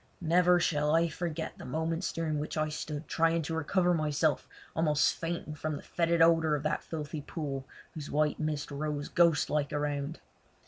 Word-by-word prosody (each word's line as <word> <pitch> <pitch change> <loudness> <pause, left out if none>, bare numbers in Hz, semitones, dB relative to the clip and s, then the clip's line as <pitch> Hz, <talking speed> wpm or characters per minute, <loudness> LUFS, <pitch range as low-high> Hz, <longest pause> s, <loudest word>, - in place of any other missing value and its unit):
Never 180 +1 +4
shall 150 -2 +2
I 165 +1 +3
forget 160 -1 -4
the - - -8
moments 160 +6 -2
during 155 -2 -1
which 150 +2 -4
I 155 0 +1
stood 150 0 -5
trying 165 0 +2
to 160 - -4
recover 175 +3 +2
myself 155 -1 +1 0.3
almost 155 -2 +3
fainting 165 -2 -4
from 155 0 -3
the - - -10
fœtid 170 -1 +1
odour 165 -2 +4
of 145 - -4
the 155 - 0
filthy 150 -1 -5
pool, 140 -3 -5 0.3
whose 150 -2 -7
white 150 0 +1
mist 155 -1 -2
rose 145 0 -3
ghostlike 150 -4 +2
around. 145 +1 -2
155 Hz, 170 wpm, -30 LUFS, 150-165 Hz, 0.3 s, Never